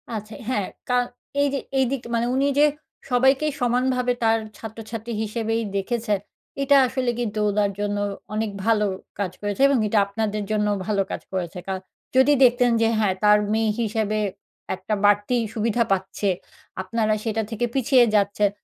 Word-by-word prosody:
আচ্ছা। 215 -1 -6 0.2
হ্যাঁ, 210 -7 0 0.2
ক্যরণ 245 0 +2 0.3
এই 285 - +3
যে 275 - 0 0.2
এইদিক 265 0 +1
মানে 230 0 +1
উনি 275 +1 +2
যে 295 - +7 0.4
সবাইকেই 265 +4 +3
সমানভাবে 250 +1 +1
তার 225 0 +4 0.2
ছাত্রছাত্রী 225 +1 -7
হিসেবেই 225 +1 -1 0.2
দেখেছেন, 210 0 -1 0.4
এটা 275 +1 +4
আসলে 255 0 -1
কিন্তু 215 -3 -2
ওনার 205 0 +1
জন্য 205 0 -1 0.4
অনেক 215 0 -1
ভালো 220 -2 +3 0.3
কাজ 195 -3 -1
হয়েছে 205 +4 -2
এবং 275 -1 +3
এটা 210 0 +3
আপনাদের 210 +1 -2
জন্যও 210 -1 +1
ভালো 205 -2 +1
কাজ - - -4
হয়েছে। 180 -1 -3
কারণ 190 -1 -3 0.3
যদি 265 +3 +6
দেখতেন 245 0 +5
যে 225 - +4
হ্যাঁ, 205 -3 +2
তার 210 0 +7 0.2
মেয়ে 220 -1 +2
হিসেবে 215 -1 0 0.6
একটা 215 - -4
বাড়তি 205 +4 +3 0.2
সুবিধা 230 +1 +1
পাচ্ছে 195 +1 0 0.5
আপনারা 215 +2 0
সেটা 225 -1 -1
থেকে 225 +2 -1
পিছিয়ে 260 -1 +5
যাচ্ছেন, 205 0 +2
220 Hz, 155 wpm, -23 LUFS, 205-245 Hz, 0.6 s, যে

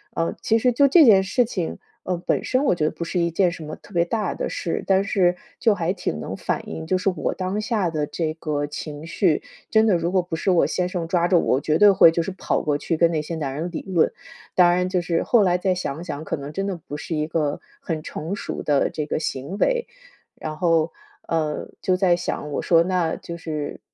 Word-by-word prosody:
呃， 165 0 0
其 225 - +2
实 250 +2 +3
就 280 +4 +4
这 320 +3 +7
件 200 -5 +7
事 225 +6 +2
情， 185 -7 -3 0.3
呃， 180 - -1
本 - - +1
身 255 +2 +1
我 - - +4
觉 155 - 0
得 155 - +1
不 170 - -6
是 175 +2 -2
一 170 0 +2
件 180 +1 +2
什 165 -2 -8
么 155 - -6
特 200 - -18
别 170 0 +3
大 210 0 -1
的 - - -3
事， 165 - -3
但 195 0 +4
是 180 -3 +2 0.2
就 220 -3 +3
还 170 -2 -1
挺 80 - -3
能 - - -5
反 - - -3
映， 160 0 -6
就 185 - +2
是 195 +1 +1
我 180 - -2
当 190 +2 -2
下 215 -5 0
的 155 -2 -1
这 160 0 -2
个 150 -3 -2
情 150 +1 -7
绪， 165 0 +1 0.3
真 220 0 +4
的， 205 -5 +4
如 170 +1 -1
果 185 - +4
不 175 -2 -5
是 - - -1
我 175 - +4
先 180 -1 -1
生 180 -2 -3
抓 175 0 +2
着 180 -1 +4
我， - - +2
我 135 - -1
绝 155 +1 +1
对 205 -1 +7
会 175 -4 +7
就 165 0 0
是 190 - -4
跑 185 - -1
过 150 -1 0
去 165 - -2
跟 170 +1 +4
那 155 -2 0
些 165 +2 -5
男 145 -4 -3
人 165 +4 -3
理 - - -4
论。 175 -4 +3 0.4
当 175 -1 +6
然 180 +1 +1
就 185 -1 0
是 170 -1 0
后 230 -4 +4
来 180 -1 +3
再 185 0 0
想 160 -4 -4
想， 155 -3 -5
可 160 - -3
能 140 +2 -7
真 195 +3 -2
的 195 -3 -3
不 145 - -5
是 150 +3 -5
一 150 0 -1
个 150 -3 -1 0.2
很 160 -3 -3
成 160 +5 -5
熟 - - -5
的 145 -2 +2
这 150 - -4
个 150 - -2
行 145 +4 -4
为。 485 - +1 0.5
然 155 -1 -5
后， 165 -2 +2 0.4
呃， 155 -2 -1
就 185 - +2
在 180 -2 +4
想， 160 -3 -4
我 - - -1
说 165 -1 +4
那 175 -2 0
就 170 0 -8
是 155 -3 -5
170 Hz, 270 characters per minute, -23 LUFS, 155-190 Hz, 0.5 s, 这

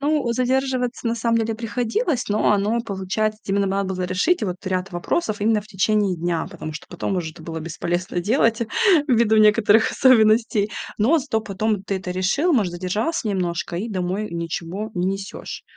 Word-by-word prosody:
Ну, 290 -3 +1
задерживаться 255 0 0
на 230 - +1
самом 230 0 +1
деле 225 0 -1
приходилось. 240 - -1
Но 210 +1 +2
оно, 210 +3 +1
получается, 215 0 -2
вот - - -6
именно 200 0 +2
надо 195 0 -1
было 185 - -3
решить 200 - +1
вот 180 -3 -2
ряд 185 0 -2
вопросов 210 - -1
именно 215 0 +2
в - - -17
течение 205 -1 +1
дня, 170 -1 -1
потому 165 -4 -7
что 155 - -8
потом 185 +2 -3
уже 165 -3 -2
это 160 - -14
было 160 0 -5
бесполезно 175 +2 -3
делать 230 +3 +2 0.5
ввиду 230 -3 +4
некоторых 215 0 +5
особенностей. 220 -4 +4 0.3
Но 255 +11 +4
зато 225 -6 -1
потом 215 0 -2
ты 200 0 -2
это 185 -1 -5
решил, 195 - +1
может, 205 -9 +2
задержался 210 - -2
немножко 175 -3 -2
и 215 +7 -3
домой 190 +2 -2
ничего 170 +5 -4
не 180 0 0
несёшь. 195 +1 -5
210 Hz, 175 wpm, -22 LUFS, 185-230 Hz, 0.5 s, некоторых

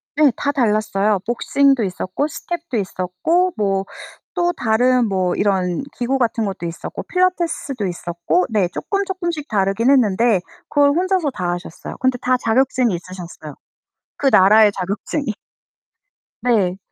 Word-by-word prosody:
네. 295 -3 +5
다 285 - -1
달랐어요. 215 -5 +1
복싱도 270 +1 +2
있었고 185 +8 -2
스텝도 335 -4 -5
있었고 200 - 0
뭐 195 -2 0 0.5
또 350 -1 +1
다른 245 -1 +2
뭐 185 -2 0
이런 185 -3 0 0.2
기구 260 +2 0
같은 230 -2 0
것도 190 -3 -4
있었고 165 - -6
필라테스도 340 - 0
있었고 175 0 -1
네. 205 -5 +2
쪼끔쪼끔씩 350 - -3
다르긴 200 +3 +1
했는데 230 -6 +3 0.3
그걸 285 -1 +4
혼자서 360 -2 +1
다 180 -7 -3
하셨어요. 175 -2 -8
근데 260 -1 +1
다 255 0 +2
자격증이 245 -1 +1
있으셨어요 175 -4 -8 0.6
그 275 - 0
나라의 210 +3 +6
자격증이. 200 - -3 1.1
네. 200 -7 +2
225 Hz, 300 characters per minute, -20 LUFS, 190-280 Hz, 1.1 s, 나라의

